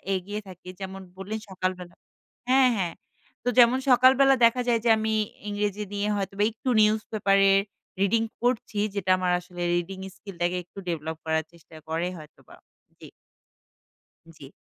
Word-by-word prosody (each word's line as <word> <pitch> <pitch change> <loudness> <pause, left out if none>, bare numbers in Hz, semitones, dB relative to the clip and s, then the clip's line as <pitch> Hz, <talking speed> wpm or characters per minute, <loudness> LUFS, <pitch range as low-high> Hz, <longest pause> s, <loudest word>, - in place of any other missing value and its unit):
এগিয়ে 205 +3 -4
থাকি। 180 -1 -11
যেমন 190 0 -7 0.2
বললেন 210 +3 -5
সকালবেলা 185 -2 -4 0.5
হ্যাঁ, 260 0 +5
হ্যাঁ। 175 -3 -1 0.5
তো - - -7
যেমন 240 +2 +6
সকালবেলা 265 +2 +6
দেখা 240 +2 +3
যায় 235 -1 +3
যে - - +4
আমি 220 0 -1 0.4
ইংরেজি 205 0 -2
নিয়ে 205 +1 -1
হয়তোবা 195 +1 -2
একটু 225 +4 -5
নিউজ 215 +1 +3
পেপার 195 -2 +2
এর 195 - +5 0.4
রিডিং 225 +3 +2 0.2
পড়ছি। 240 -4 -1 0.2
যেটা 190 -2 0
আমার 180 -1 0
আসলে 180 0 -10
রিডিং 185 +2 -3 0.2
স্কিলটাকে 180 -3 -3
একটু 180 - -26
ডেভেলপ 160 -1 -4
করার 160 0 0
চেষ্টা 165 -1 -18
করে 165 +2 -1
হয়তোবা। 150 -1 -15 0.4
জ্বি। - - -12 1.3
জ্বি। 140 - -12
195 Hz, 150 wpm, -26 LUFS, 180-220 Hz, 1.3 s, যেমন